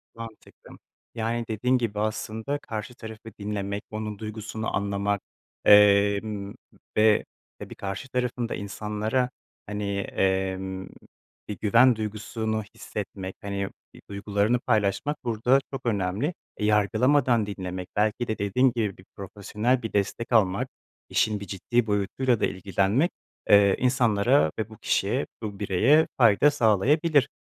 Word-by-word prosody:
Mantıklı. 115 -1 -12 0.4
Yani, 115 +1 -1
dediğin 125 +4 +1
gibi 110 -4 -2
aslında 110 +5 -2
karşı 110 +2 -6
tarafı 110 -1 -9
dinlemek, 100 -1 -3
onun 105 -1 -5
duygusunu 110 0 -4
anlamak, 100 0 -1 0.4
emm, 100 0 +5 0.4
ve 110 0 +4 0.3
tabii - - -9
karşı 100 +6 -5
tarafın 125 -1 -2
da - - -2
insanlara 105 +5 -2 0.4
hani, 105 -1 -3
emm, 95 0 -1 0.6
bir 105 -3 -5
güven 120 +3 +5
duygusunu 110 +1 -3
hissetmek, 95 -2 -6
hani, 100 -1 -3 0.2
bir - - -15
duygularını 100 +4 0
paylaşmak 110 +5 0
burada 120 +3 +2
çok 130 -2 -5
önemli. 105 - 0 0.2
E, 105 - -1
yargılamadan 115 +3 +3
dinlemek, 95 -2 -5
belki 110 +3 +1
de 110 - -2
dediğin 120 +6 +2
gibi 105 -5 -2
profesyonel 105 +5 -1
bir 115 - -5
destek 105 +4 -1
almak, 100 -4 +3 0.4
işin 105 -1 +1
bir 100 - -8
ciddi 110 +4 0
boyutuyla 105 +4 +1
da - - +2
ilgilenmek, 100 - +1 0.4
eee, 100 -1 +6
insanlara 125 - +3
ve 110 0 -2
bu 110 - -12
kişiye, - - 0 0.2
bu 105 -3 -6
bireye 115 - +4
fayda 120 +4 +5
sağlayabilir. 145 - +3
105 Hz, 125 wpm, -26 LUFS, 100-120 Hz, 0.6 s, eee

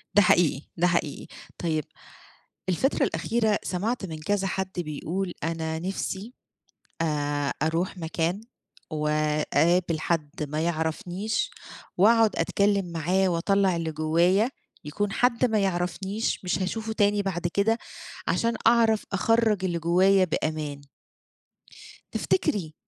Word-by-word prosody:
ده 205 - +8
حقيقي، 165 -6 +3 0.2
ده 175 +1 +3
حقيقي. 170 -4 -1 0.3
طيب، 155 -3 -1 0.9
الفترة 225 - +1
الأخيرة 220 -3 +1
سمعت 205 +4 -2
من 160 -3 -6
كذا 195 +5 0
حد 190 0 -2
بيقول: 175 +3 -3
"أنا 160 -1 -2
نفسي 195 +5 -4 0.7
أ - - +2 0.6
أروح 170 +4 -1
مكان 170 +3 -2 0.5
وأقابل 155 +2 +1
حد 155 -3 -2
ما 150 +1 -2
يعرفنيش 170 +5 -1 0.5
وأقعد 220 +3 +5
أتكلّم 200 -1 +1
معاه 180 +4 +1
وأطلّع 190 +2 +2
اللي 165 -1 -2
جوّايا، 170 +8 +2 0.3
يكون 200 +8 -2
حد 245 +3 +2
ما 220 -3 +1
يعرفنيش، 190 +3 -1
مش 180 +1 0
هاشوفه 220 +4 -2
تاني 205 -1 +2
بعد 175 -3 -2
كده، 200 +6 +1 0.5
عشان 230 0 +1
أعرف 225 -2 +4
أخَرّج 220 -1 +2
اللي 170 -2 -1
جوّايا 185 +3 +4
بأمان." 155 -3 -3 1.3
تفتكري، 205 - 0
180 Hz, 115 wpm, -26 LUFS, 160-205 Hz, 1.3 s, ده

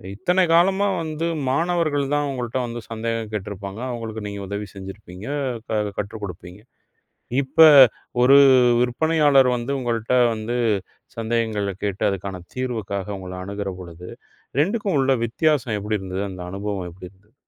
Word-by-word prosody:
இத்தனை 180 - +2
காலமா 190 +4 +4
வந்து 155 0 -3 0.2
மாணவர்கள் 160 -1 +1
தான் 145 -1 0
உங்கள்ட்ட 125 -1 -3
வந்து 120 0 -5
சந்தேகம் 115 -1 -3
கேட்டு 105 -2 -4
இருப்பாங்க. 100 +2 -7
அவுங்களுக்கு 110 -3 -5
நீங்க 100 0 -6
உதவி 100 +1 -4
செஞ்சிருப்பீங்க. 95 0 -10 0.3
எ - - -7 0.3
க - - -5
கற்று 105 +2 -4
கொடுப்பீங்க. 90 +1 -8 0.8
இப்ப, 130 +4 -2 0.6
ஒரு 135 +3 +7 0.4
விற்பனையாளர் 140 +1 +3
வந்து, 120 +3 -3
உங்கள்ட 120 -1 -2 0.2
வந்து 110 +3 -3 0.6
சந்தேகங்களைக் 110 -4 -2
கேட்டு 100 -1 -2
அதுக்கான 95 -2 -5
தீர்வுக்காக 110 -6 -3
உங்கள 90 -1 -8
அனுகுற 100 0 -4
பொழுது 90 0 -10 0.5
2க்கும் 200 0 0
உள்ள 135 0 +3
வித்தியாசம் 125 -2 +1
எப்படி 105 +1 -2
இருந்தது? 95 0 -4
அந்த 90 -1 -9
அனுபவம் 100 -1 -4
எப்டி 90 +1 -11
இருந்தது? 100 +3 -29
110 Hz, 135 wpm, -22 LUFS, 100-135 Hz, 0.8 s, ஒரு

